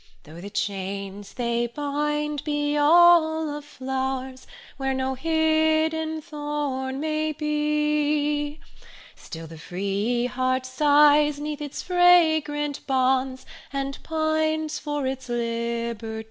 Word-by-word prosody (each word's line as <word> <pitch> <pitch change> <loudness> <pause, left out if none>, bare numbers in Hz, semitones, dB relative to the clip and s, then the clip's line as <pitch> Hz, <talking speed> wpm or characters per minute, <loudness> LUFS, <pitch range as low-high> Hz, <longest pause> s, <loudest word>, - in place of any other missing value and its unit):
Though 160 +3 -12
the 200 - -7
chains 200 0 -4
they 235 -1 0
bind 295 +2 -2
be 295 -1 -1
all 320 0 +5
of 295 - -7
flowers, 265 -2 -4 0.3
Where 270 -1 -1
no 265 0 -1
hidden 315 +1 +1
thorn 290 -4 -3
may 310 0 -1
be, 300 0 0 0.6
Still 165 0 -9
the 160 0 -11
free 200 +8 -1
heart 255 +1 -1
sighs 295 +2 +4
'neath 300 0 -4
its 290 -1 -5
fragrant 315 -5 +3
bonds, 260 0 +1 0.3
And 275 0 -4
pines 315 0 -1
for 295 -2 -3
its 265 -1 -4
liberty. 235 -1 -3
290 Hz, 105 wpm, -25 LUFS, 255-305 Hz, 0.6 s, all